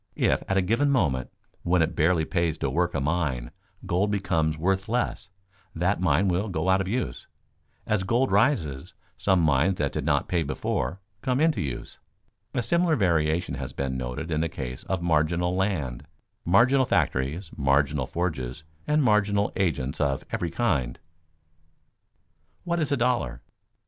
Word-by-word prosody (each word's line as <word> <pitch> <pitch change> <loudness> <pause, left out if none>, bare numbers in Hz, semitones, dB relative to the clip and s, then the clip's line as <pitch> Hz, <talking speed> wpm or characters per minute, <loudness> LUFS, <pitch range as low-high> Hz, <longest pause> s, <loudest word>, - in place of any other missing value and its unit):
If - - +2
at 95 - +1
a 95 - +3
given 115 +10 +2
moment, 70 - +1 0.3
when 85 -1 +2
it - - -2
barely 80 0 +2
pays 85 -2 0
to 70 -3 -2
work 85 +4 0
a - - +1
mine, 70 -5 -1 0.3
gold 95 +4 +1
becomes 85 -6 0
worth 95 +5 0
less, 120 -4 -1 0.5
that 90 +3 0
mine 95 +1 +3
will 95 +4 0
go 90 0 -1
out 95 +1 +4
of 95 - -3
use. 110 - -3 0.6
As 105 -2 +1
gold 120 +7 +1
rises, 80 - +1 0.2
some 95 -3 +2
mines 80 +4 +3
that 75 -5 -1
did - - -3
not - - +1
pay 85 -2 +1
before, 70 +1 -2 0.2
come 130 +2 0
into 160 0 +2
use. 65 -5 -6 0.6
A 125 - +1
similar 170 +3 +2
variation 85 - +1
has - - -5
been 65 -1 -2
noted 65 +6 -4
in 80 0 +1
the 80 - 0
case 65 -2 -6
of 95 -2 -2
marginal 85 +2 +1
land, 75 -9 -2 0.4
marginal 125 +9 +4
factories, 75 +7 0
marginal 70 -1 +1
forges, 80 -5 -3 0.2
and 150 0 +3
marginal 105 -3 +2
agents 75 -8 -1
of 70 -2 0
every 85 - -1
kind. 80 - 0
[Sidenote: - - -34 1.6
"What 170 -1 -1
is 155 -2 -1
a 140 - +2
dollar?" 120 - 0
85 Hz, 160 wpm, -26 LUFS, 75-100 Hz, 1.6 s, out